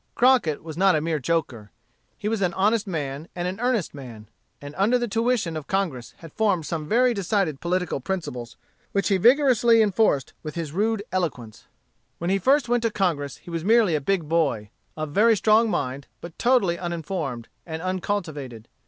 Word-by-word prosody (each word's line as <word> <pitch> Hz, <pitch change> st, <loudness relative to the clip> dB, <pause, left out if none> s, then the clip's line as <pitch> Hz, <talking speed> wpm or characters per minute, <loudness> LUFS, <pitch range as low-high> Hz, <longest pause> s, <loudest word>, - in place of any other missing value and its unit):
Crockett 245 Hz, -, +3 dB
was 160 Hz, -1 st, -8 dB
not 190 Hz, -1 st, +4 dB
a -, -, +2 dB
mere 160 Hz, 0 st, -1 dB
joker. 130 Hz, -8 st, -2 dB, 0.5 s
He 210 Hz, -, -4 dB
was 220 Hz, -1 st, -1 dB
an 180 Hz, -2 st, 0 dB
honest 210 Hz, +3 st, +1 dB
man, 150 Hz, -3 st, -4 dB
and 175 Hz, 0 st, -2 dB
an 185 Hz, +3 st, -4 dB
earnest 245 Hz, -6 st, 0 dB
man; 115 Hz, -7 st, -10 dB, 0.3 s
and 145 Hz, 0 st, -9 dB
under 210 Hz, +6 st, +3 dB
the 240 Hz, -1 st, -2 dB
tuition 225 Hz, -6 st, 0 dB
of 155 Hz, -2 st, -6 dB
Congress 170 Hz, -12 st, -2 dB
had 165 Hz, -3 st, -13 dB
formed 200 Hz, -7 st, +1 dB
some 155 Hz, 0 st, -4 dB
very 245 Hz, +5 st, +3 dB
decided 195 Hz, -7 st, -1 dB
political 180 Hz, -3 st, -1 dB
principles, 125 Hz, -9 st, -5 dB, 0.4 s
which 200 Hz, +1 st, +1 dB
he 195 Hz, -, +3 dB
vigorously 240 Hz, 0 st, +5 dB
enforced 205 Hz, -, +2 dB
with 155 Hz, -2 st, -7 dB
his 165 Hz, -4 st, -4 dB
rude 210 Hz, +4 st, 0 dB
eloquence. 125 Hz, -12 st, -4 dB, 0.5 s
When 170 Hz, +2 st, -2 dB
he 195 Hz, -, +2 dB
first 270 Hz, +6 st, +3 dB
went 240 Hz, 0 st, +1 dB
to 230 Hz, -, +1 dB
Congress 165 Hz, -10 st, -1 dB
he 175 Hz, -, -12 dB
was 165 Hz, -1 st, -3 dB
merely 220 Hz, -3 st, +4 dB
a 150 Hz, -, 0 dB
big 170 Hz, +1 st, 0 dB
boy, 140 Hz, -11 st, 0 dB, 0.3 s
of 155 Hz, -1 st, -4 dB
very 220 Hz, +6 st, +4 dB
strong 220 Hz, +2 st, +4 dB
mind, 140 Hz, -5 st, -3 dB
but 170 Hz, -2 st, -10 dB
totally 235 Hz, -9 st, +2 dB
uninformed, 165 Hz, -8 st, -4 dB, 0.2 s
and 160 Hz, 0 st, -6 dB
uncultivated. 160 Hz, -, -4 dB
175 Hz, 180 wpm, -24 LUFS, 150-215 Hz, 0.5 s, vigorously